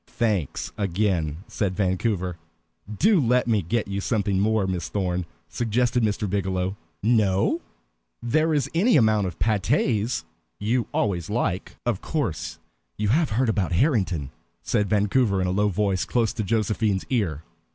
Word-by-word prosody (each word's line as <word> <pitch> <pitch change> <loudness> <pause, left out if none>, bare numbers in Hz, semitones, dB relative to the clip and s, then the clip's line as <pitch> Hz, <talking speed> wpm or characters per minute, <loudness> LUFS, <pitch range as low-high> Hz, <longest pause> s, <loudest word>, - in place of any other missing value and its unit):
"Thanks, 110 - -1
again," 90 -5 0
said 95 -3 -2
Vancouver. 95 -2 0 0.5
"Do 190 - +3
let 125 0 +2
me 110 -3 +2
get 105 +6 -1
you 100 0 -3
something 100 -3 0
more, 110 0 +2
Miss 90 -4 -3
Thorn," 90 -3 -1 0.2
suggested 120 +1 0
Mr. 105 -1 0
Biggielow. 95 -1 -1 0.3
"No? 105 -4 +2 0.6
There 155 +7 +1
is 145 -4 +1
any 200 +6 +4
amount 110 -5 +3
of 85 - -7
pâtés. 110 +1 +1 0.3
You 115 +4 0
always 90 -4 -1
like" 100 -4 -2
"Of 120 -6 0
course 85 - -3 0.4
you 105 -1 0
have 155 +6 +3
heard 120 +4 +1
about 100 -6 0
Harrington?" 95 - +1 0.3
said 105 -2 0
Vancouver 105 0 +2
in 95 - +1
a 90 - 0
low 105 +2 +2
voice 100 -1 0
close 115 -2 0
to 120 - -3
Josephine's 105 -1 0
ear. 85 - 0
105 Hz, 145 wpm, -25 LUFS, 95-115 Hz, 0.6 s, any